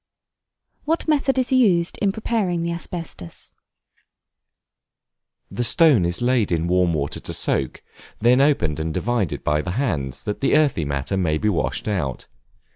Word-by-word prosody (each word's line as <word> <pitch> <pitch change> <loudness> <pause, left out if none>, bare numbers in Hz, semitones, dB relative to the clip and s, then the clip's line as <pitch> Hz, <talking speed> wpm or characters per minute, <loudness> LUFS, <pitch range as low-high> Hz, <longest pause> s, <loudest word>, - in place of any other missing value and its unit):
What 325 +2 -1
method 280 -3 +1
is 255 0 0
used 190 -10 +2
in 200 - +2
preparing 200 -5 -1
the 170 - -2
Asbestus? 165 - -8 2.0
The 120 - -2
stone 140 - +4
is 85 +7 -2
laid 120 -5 +1
in 85 0 0
warm 90 -2 +2
water 70 -1 -3
to - - -5
soak, 65 - -1 0.3
then 125 +4 +4
opened 85 - +1
and 80 +1 -2
divided 115 -1 -2
by 75 0 +1
the 90 - -6
hands, 70 - -2
that 105 - -4
the 140 - +3
earthy 140 - +1
matter 70 +7 -2
may 80 -5 +1
be 105 - 0
washed 95 +2 -2
out. 80 - -2
115 Hz, 150 wpm, -22 LUFS, -, 2.0 s, stone